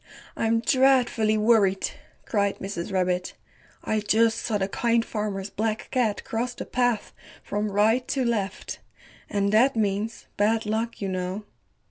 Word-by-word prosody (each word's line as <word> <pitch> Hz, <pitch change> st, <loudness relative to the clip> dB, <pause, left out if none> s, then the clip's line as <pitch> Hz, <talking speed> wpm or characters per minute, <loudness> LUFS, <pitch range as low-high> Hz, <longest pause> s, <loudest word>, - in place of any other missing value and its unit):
I'm 225 Hz, 0 st, +1 dB
dreadfully 245 Hz, -4 st, +3 dB
worried," 210 Hz, -3 st, +3 dB, 0.3 s
cried 200 Hz, -2 st, 0 dB
Mrs. 195 Hz, -2 st, -5 dB
Rabbit, 180 Hz, -1 st, 0 dB, 0.5 s
"I 215 Hz, -, 0 dB
just 225 Hz, +2 st, +2 dB
saw 220 Hz, -3 st, -1 dB
the 190 Hz, -1 st, -1 dB
Kind 230 Hz, +3 st, +1 dB
Farmer's 205 Hz, -2 st, -3 dB
Black 220 Hz, 0 st, -2 dB
Cat 230 Hz, -5 st, 0 dB
cross 240 Hz, +2 st, -3 dB
the -, -, -6 dB
path 245 Hz, -4 st, 0 dB, 0.3 s
from 210 Hz, 0 st, -2 dB
right 220 Hz, +5 st, +2 dB
to 265 Hz, -2 st, 0 dB
left, 210 Hz, -5 st, -2 dB, 0.5 s
and 200 Hz, 0 st, +1 dB
that 240 Hz, +5 st, +4 dB
means 215 Hz, +1 st, -1 dB
bad 220 Hz, +2 st, +2 dB
luck, 220 Hz, +1 st, -2 dB
you -, -, -1 dB
know." 185 Hz, +2 st, -3 dB
215 Hz, 140 wpm, -25 LUFS, 200-230 Hz, 0.5 s, that